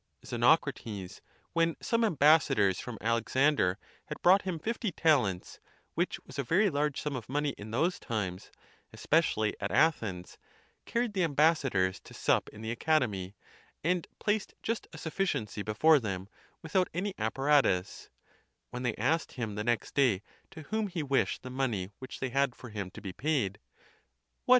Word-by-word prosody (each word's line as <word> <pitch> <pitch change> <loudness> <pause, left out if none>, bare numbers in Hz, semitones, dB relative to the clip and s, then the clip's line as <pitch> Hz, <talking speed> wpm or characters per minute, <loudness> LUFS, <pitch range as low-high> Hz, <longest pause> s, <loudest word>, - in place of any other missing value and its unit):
Xenocrates, 100 -5 0 0.3
when 165 -1 +2
some 230 -1 +1
ambassadors 145 - +4
from 120 -3 -6
Alexander 115 -2 +2 0.3
had 150 - -6
brought 190 +3 +6
him 185 -4 -3
fifty 220 +4 -2
talents, 130 - +1 0.3
which - - -1
was - - -10
a - - +1
very 185 - +3
large 145 0 0
sum 150 -2 -3
of 120 -2 -6
money 145 +2 0
in 105 +1 -9
those 160 +11 0
times, 95 -7 -4 0.4
especially 125 -10 +1
at 100 - -2
Athens, 110 - +1 0.5
carried 235 -2 0
the 190 -2 +1
ambassadors 140 - +2
to - - -14
sup - - +1
in 105 - -12
the 110 - -2
Academy, 115 - 0 0.5
and 175 +1 0
placed 210 -1 -1
just 230 0 -2
a 160 - -10
sufficiency 145 - -2
before 125 +10 +4
them, 95 -5 -4 0.4
without 180 +3 +1
any 195 +3 -1
apparatus, 110 -4 +1 0.6
When 125 - -5
they 120 -3 -1
asked 150 +9 0
him, 115 -4 -4
the 105 +1 -3
next 120 -2 -1
day, 120 -9 +3 0.3
to 160 -5 -10
whom 215 +7 -1
he 175 -5 -3
wished 135 -8 0
the 130 - -7
money 115 -8 -1
which 130 - -8
they 130 - -2
had 135 0 +1
for 120 - -11
him 100 -3 -4
to - - -11
be 95 -3 -6
paid: 130 -9 -1 0.4
" - - -48
What!" - - -12
135 Hz, 160 wpm, -30 LUFS, 105-160 Hz, 0.6 s, brought